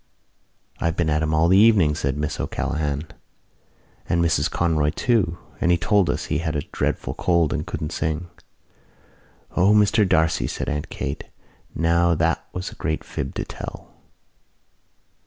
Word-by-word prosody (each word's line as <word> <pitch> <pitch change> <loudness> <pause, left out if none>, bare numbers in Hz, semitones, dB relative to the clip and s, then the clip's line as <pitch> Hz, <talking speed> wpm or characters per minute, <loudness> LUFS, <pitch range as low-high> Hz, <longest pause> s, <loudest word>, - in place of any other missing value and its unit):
"I - - -3
have 85 0 +1
been 80 -3 0
at 75 +1 +1
him 80 0 0
all 80 +2 +3
the 95 +2 +5
evening," 100 -9 +5
said 70 -2 -2
Miss 75 0 -3
O'Callaghan, 75 -1 -2 1.0
"and 85 - +2
Mrs 80 -3 +2
Conroy 80 -3 +1
too 100 -3 +1 0.2
and 90 - +2
he 85 - +4
told 100 +2 +2
us - - -1
he - - -1
had 80 -2 -2
a 70 - -1
dreadful - - -2
cold 85 -4 +1
and 80 0 -3
couldn't 75 - -4
sing." 80 +3 -2 1.3
"O, 95 +4 +4
Mr 105 -1 +4
D'Arcy," 80 -3 +2
said - - -3
Aunt 75 0 -3
Kate, 70 - -4 0.5
"now 85 +1 +3
that - - +1
was 90 0 -5
a - - -12
great 80 0 -1
fib 65 - -5
to - - -3
tell." - - -9
80 Hz, 160 wpm, -23 LUFS, 75-90 Hz, 1.3 s, the